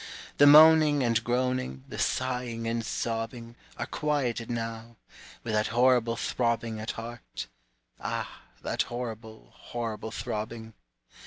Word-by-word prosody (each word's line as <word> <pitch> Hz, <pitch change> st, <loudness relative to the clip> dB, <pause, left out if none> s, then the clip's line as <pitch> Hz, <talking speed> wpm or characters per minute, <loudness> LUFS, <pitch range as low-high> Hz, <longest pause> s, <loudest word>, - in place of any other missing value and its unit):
The 145 Hz, -, +8 dB
moaning 155 Hz, -1 st, +8 dB
and 115 Hz, -1 st, +2 dB
groaning, 125 Hz, -, -1 dB
The -, -, -7 dB
sighing 125 Hz, -3 st, -1 dB
and 115 Hz, 0 st, -1 dB
sobbing, 115 Hz, +2 st, -4 dB, 0.2 s
Are -, -, -2 dB
quieted 135 Hz, -7 st, -1 dB
now, 115 Hz, 0 st, -4 dB, 0.5 s
With 110 Hz, -, -3 dB
that 105 Hz, 0 st, +2 dB
horrible 120 Hz, -1 st, +3 dB
throbbing 115 Hz, -3 st, -1 dB
At 110 Hz, -, -4 dB
heart, 115 Hz, +1 st, -7 dB, 0.5 s
ah, -, -, -4 dB, 0.2 s
that -, -, 0 dB
horrible, 115 Hz, -2 st, -7 dB
Horrible 115 Hz, -2 st, -5 dB
throbbing! 110 Hz, 0 st, -5 dB
115 Hz, 115 wpm, -28 LUFS, 115-125 Hz, 0.5 s, The